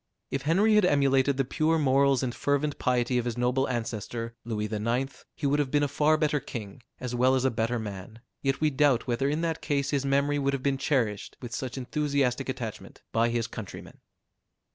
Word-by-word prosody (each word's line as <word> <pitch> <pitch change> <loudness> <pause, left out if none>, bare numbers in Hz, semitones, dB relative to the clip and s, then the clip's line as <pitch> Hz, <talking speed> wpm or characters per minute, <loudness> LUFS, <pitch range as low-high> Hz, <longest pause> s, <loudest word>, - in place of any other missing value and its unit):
If 135 - -1
Henry 190 +9 +3
had 210 -1 +5
emulated 140 -3 +3
the 135 - +1
pure 155 +5 +1
morals 140 -2 +3
and 125 -2 -1
fervent 145 +2 0
piety 125 0 +1
of 120 - -3
his 120 -1 -3
noble 125 +2 +1
ancestor, 115 -1 -4
Louis 110 -2 -2
IX., 115 +5 -2
he 150 - -5
would 145 +1 +2
have 145 -3 +1
been 145 +1 +2
a - - +2
far 150 +2 +3
better 150 -1 +1
king, 110 -3 -8 0.2
as 125 -1 -4
well 130 +2 +3
as 130 0 +1
a 130 - +3
better 115 +1 0
man; 105 0 -7 0.2
yet 135 -1 0
we 155 -1 +3
doubt 135 -3 +3
whether 125 +3 0
in 150 +3 -1
that 165 -1 -1
case 140 -2 0
his 140 -2 +1
memory 140 +1 +1
would 140 0 +1
have 135 -2 -3
been 140 -1 +1
cherished 115 -9 -1
with 120 -2 -8
such 130 0 -4
enthusiastic 140 -1 0
attachment - - -6
by 115 +1 +2
his 115 -1 0
countrymen. 110 -3 -9
135 Hz, 205 wpm, -28 LUFS, 120-145 Hz, 0.2 s, had